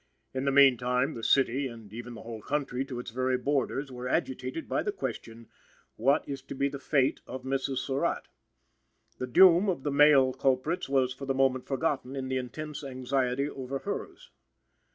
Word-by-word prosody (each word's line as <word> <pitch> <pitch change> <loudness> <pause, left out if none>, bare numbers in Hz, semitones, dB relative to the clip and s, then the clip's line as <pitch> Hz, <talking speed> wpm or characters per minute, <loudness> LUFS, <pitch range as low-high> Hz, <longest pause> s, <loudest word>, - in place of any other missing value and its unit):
In 130 +1 -2
the 140 - +2
meantime, 130 0 +4
the 115 - -8
city, 135 +1 +2
and 115 -4 -11
even 120 +1 -7
the - - -10
whole 115 -1 -7
country 135 0 -2
to 130 -3 -6
its 125 - -7
very 130 +1 0
borders, 140 +1 -1
were 125 0 -6
agitated 130 +1 -2
by - - 0
the 410 - -1
question: 115 - -6 0.5
What 135 +7 +2
is 140 -2 -5
to 135 - -8
be 140 +1 +1
the 140 0 -7
fate 135 -2 +1
of 130 0 -7
Mrs. 135 0 -1
Surratt? 135 +2 -1 0.9
The 125 - -3
doom 185 - +6
of 170 -8 -2
the 145 - -1
male 140 -2 +6
culprits 135 +6 0
was 130 -2 +2
for 135 +1 -8
the 135 - 0
moment 130 -1 +1
forgotten 135 -2 -1
in 130 -1 -4
the 130 - 0
intense 150 +4 -6
anxiety 130 0 -1
over 135 -1 -5
hers. - - -6
135 Hz, 180 wpm, -29 LUFS, 125-140 Hz, 0.9 s, doom